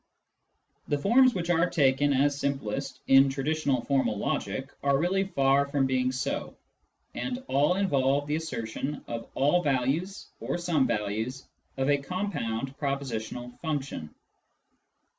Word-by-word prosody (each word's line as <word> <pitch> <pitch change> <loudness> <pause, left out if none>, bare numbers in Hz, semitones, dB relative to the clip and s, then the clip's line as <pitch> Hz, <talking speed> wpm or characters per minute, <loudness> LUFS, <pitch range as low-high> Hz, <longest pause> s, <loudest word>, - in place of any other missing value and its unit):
The 145 - +1
forms 245 - +4
which 175 -1 -1
are 175 +1 +3
taken 140 -1 +3
as 140 +1 +3
simplest 135 -1 -3
in 135 +1 +6
traditional 140 -1 0
formal 135 -6 +1
logic 130 +7 -2
are 140 -1 +3
really 185 +5 +1
far 140 -5 +2
from 140 -1 +1
being 130 -1 +1
so, 130 0 -3 0.6
and 255 0 -4
all 145 +6 +3
involve 145 -7 +2
the 150 +1 -1
assertion 145 -2 -4
of 115 -1 -5
all 145 +7 +3
values 145 +7 -1
or - - -2
some 170 -6 +1
values 110 +4 -2 0.3
of 135 0 0
a 145 -1 +3
compound 140 - -3
propositional 125 -4 -4
function. 140 - -4
140 Hz, 130 wpm, -28 LUFS, 130-155 Hz, 0.6 s, in